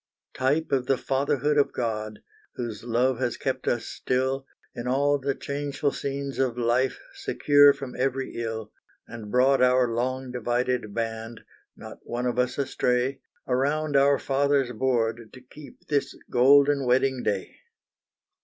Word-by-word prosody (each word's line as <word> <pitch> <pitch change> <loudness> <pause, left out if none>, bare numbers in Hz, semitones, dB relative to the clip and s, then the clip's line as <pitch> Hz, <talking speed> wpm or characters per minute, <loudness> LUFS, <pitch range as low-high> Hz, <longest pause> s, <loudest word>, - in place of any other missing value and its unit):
Type 145 +5 0
of 130 -2 0
the 135 - +2
Fatherhood 140 +2 0
of 140 - +2
God, 110 -2 -4 0.3
Whose 115 -4 -5
love 120 +2 +1
has 125 -2 -1
kept 130 -1 -3
us 120 -1 0
still, 130 +1 -2 0.3
In 120 +1 -6
all 140 +3 +2
the 140 0 -1
changeful 140 0 -2
scenes 140 0 -4
of 125 -3 0
life 120 +2 +1
Secure 145 -1 +5
from 135 -2 -7
every 130 +1 -2
ill, 110 -2 -4 0.4
And 115 -2 -9
brought 130 +3 +3
our 125 0 +4
long 130 +2 -2
divided 125 -2 -1
band, 115 0 -4 0.4
Not - - -10
one 120 +1 -4
of 125 0 -1
us 125 0 0
astray, 130 -1 0 0.3
Around 145 +4 0
our 140 0 +5
Father's 140 -1 +1
board 115 -2 -1
to 130 - -11
keep 130 +2 -15
This 145 -2 -1
Golden 140 +3 +5
Wedding 130 +1 +2
Day. 100 -5 -3
130 Hz, 145 wpm, -26 LUFS, 120-140 Hz, 0.4 s, Secure